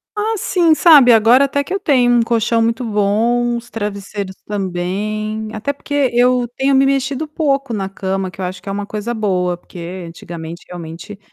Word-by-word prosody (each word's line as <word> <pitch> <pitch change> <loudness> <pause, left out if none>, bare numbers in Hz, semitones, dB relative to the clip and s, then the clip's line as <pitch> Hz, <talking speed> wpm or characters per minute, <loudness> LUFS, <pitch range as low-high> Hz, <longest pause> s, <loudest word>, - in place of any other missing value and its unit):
Ah, 435 +2 -1
sim, 345 -4 +2
sabe, 295 -8 +7
agora 235 +5 +6
até 285 +1 -1
que 365 - -6
eu 395 - -1
tenho 255 -9 +3
um - - +4
colchão 230 0 +1
muito 230 +2 0
bom, 230 +3 +1
os 235 0 -10
travesseiros 200 -2 -5
também, 210 +3 -3
até 225 +7 -3
porque 285 -2 -1
eu 245 0 +3
tenho 270 +1 +2
me 270 +1 +5
mexido 275 +2 0
pouco 275 -4 -1
na 195 -3 -3
cama, 195 -1 -3
que 180 - -16
eu 185 - -2
acho 185 +1 -6
que 195 - -8
é - - -2
uma 200 +1 -3
coisa 215 +3 -4
boa, 185 -6 -1
porque 175 +1 -8
antigamente 165 0 -9
realmente 175 +4 -9
220 Hz, 185 wpm, -17 LUFS, 195-265 Hz, -, sabe